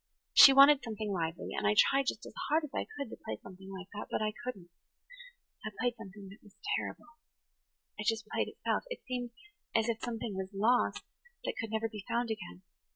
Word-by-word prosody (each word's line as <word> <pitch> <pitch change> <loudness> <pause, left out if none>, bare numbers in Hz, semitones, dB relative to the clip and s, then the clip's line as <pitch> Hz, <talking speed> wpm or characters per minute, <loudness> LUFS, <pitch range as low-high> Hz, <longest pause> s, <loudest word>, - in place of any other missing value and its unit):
She 275 - +11
wanted 275 +1 +8
something 215 -2 -4
lively, 165 -2 -2
and - - 0
I 105 - +3
tried 275 -1 +5
just - - -2
as - - -10 0.2
hard 315 +2 +3
as 300 - -6
I - - -2
could 280 -5 -4
to - - -7
play 110 - -4
something 190 0 -12
like 190 -1 -7
that. 210 - -6
But - - -1
I 215 0 0
couldn't. 195 -9 -6 0.9
I 215 - -3
played 245 0 +1
something 205 -3 -10
that 200 - -14
was 205 -2 -19 0.2
terrible–it 305 - -9
just 225 -1 +1
played - - 0
itself–it - - -3
seemed 250 -2 -3 0.5
as 225 0 +3
if 230 -1 0
something 230 -2 -3
was 190 +1 -5
lost 235 +5 +2 0.4
that - - -2
could 225 - -4
never 220 +1 0
be 215 -3 -8
found 235 -1 0
again. 190 -3 -7
220 Hz, 195 wpm, -32 LUFS, 195-245 Hz, 0.9 s, She